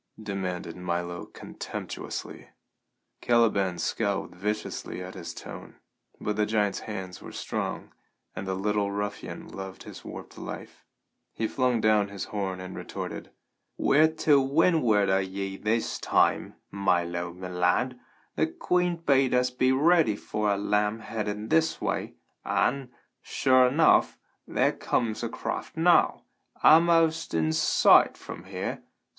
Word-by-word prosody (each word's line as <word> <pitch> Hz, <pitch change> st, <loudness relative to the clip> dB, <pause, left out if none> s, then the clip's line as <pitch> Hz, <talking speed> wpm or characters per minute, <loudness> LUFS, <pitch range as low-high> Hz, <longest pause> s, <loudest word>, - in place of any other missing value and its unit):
demanded 90 Hz, -4 st, -4 dB
Milo 85 Hz, -1 st, -3 dB
contemptuously. -, -, -7 dB, 0.7 s
Caliban 105 Hz, -6 st, +2 dB
scowled 100 Hz, -2 st, -2 dB
viciously 105 Hz, -1 st, -4 dB
at 90 Hz, +1 st, -8 dB
his 85 Hz, -3 st, -7 dB
tone, -, -, -10 dB, 0.4 s
but 105 Hz, -1 st, -2 dB
the 105 Hz, -1 st, +2 dB
giant's 105 Hz, -2 st, +1 dB
hands 95 Hz, -4 st, -7 dB
were -, -, -9 dB
strong, -, -, -4 dB, 0.4 s
and 95 Hz, -, -5 dB
the 95 Hz, -, -1 dB
little 100 Hz, +1 st, 0 dB
ruffian 100 Hz, 0 st, -5 dB
loved 95 Hz, -1 st, -8 dB
his -, -, -11 dB
warped -, -, -9 dB
life. -, -, -8 dB, 0.5 s
He 110 Hz, -, -1 dB
flung 125 Hz, -2 st, +1 dB
down 110 Hz, -1 st, +3 dB
his 100 Hz, -1 st, -6 dB
horn 95 Hz, -3 st, -2 dB
and 95 Hz, 0 st, -7 dB
retorted: -, -, -6 dB, 0.5 s
"We're 155 Hz, +3 st, +5 dB, 0.2 s
to 145 Hz, -3 st, +6 dB
windward 135 Hz, -, +3 dB
o' 95 Hz, -, +3 dB
ye 95 Hz, 0 st, -4 dB
this 110 Hz, +3 st, -1 dB
time, -, -, +1 dB, 0.2 s
Milo 85 Hz, -3 st, 0 dB
me 90 Hz, +1 st, -8 dB
lad. 90 Hz, +8 st, +1 dB, 0.4 s
Th' 160 Hz, -, 0 dB
queen 180 Hz, -1 st, +1 dB
bade 135 Hz, -6 st, +2 dB
us 125 Hz, 0 st, +2 dB
be 130 Hz, +1 st, +2 dB
ready 150 Hz, -4 st, +4 dB
for 105 Hz, 0 st, -2 dB
a 100 Hz, -, +1 dB
lamb 105 Hz, +2 st, 0 dB
headed 105 Hz, -1 st, -4 dB
this 160 Hz, 0 st, +2 dB
way, -, -, -2 dB, 0.3 s
an', 135 Hz, 0 st, 0 dB, 0.3 s
sure 130 Hz, -1 st, +3 dB
enough, 155 Hz, +6 st, +4 dB, 0.3 s
there -, -, +2 dB
comes 115 Hz, -3 st, -1 dB
a -, -, -2 dB
craft -, -, -5 dB
now, -, -, +4 dB, 0.4 s
a'most 165 Hz, -, +5 dB
in 80 Hz, -1 st, +1 dB
sight 80 Hz, -, +5 dB
from -, -, -9 dB
here. -, -, -4 dB
105 Hz, 135 wpm, -27 LUFS, 95-130 Hz, 0.7 s, to